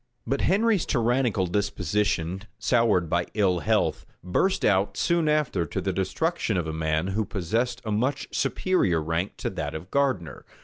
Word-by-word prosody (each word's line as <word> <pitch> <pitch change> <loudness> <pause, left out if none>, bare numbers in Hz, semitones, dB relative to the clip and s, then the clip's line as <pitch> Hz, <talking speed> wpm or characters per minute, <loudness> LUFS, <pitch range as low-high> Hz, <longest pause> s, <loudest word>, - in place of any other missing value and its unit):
But 135 +4 -1
Henry's 210 0 +2
tyrannical 120 -5 +1
disposition, 95 -2 -1 0.2
soured 115 -8 +2
by 85 +2 0
ill 95 -4 +2
health, 75 - +1 0.2
burst 185 - +1
out 100 -1 +2
soon 170 -3 +2
after 150 - +1
to - - -3
the 95 - -1
destruction 110 - -1
of 85 - -1
a 80 - -4
man 80 +2 0
who 105 +3 0
possessed 110 +6 -2
a 110 - -2
much 125 +7 0
superior 135 - +1
rank 80 +5 -2
to - - -3
that - - -4
of 85 +4 -8
Gardiner. 130 - 0
100 Hz, 160 wpm, -26 LUFS, 90-130 Hz, 0.2 s, Henry's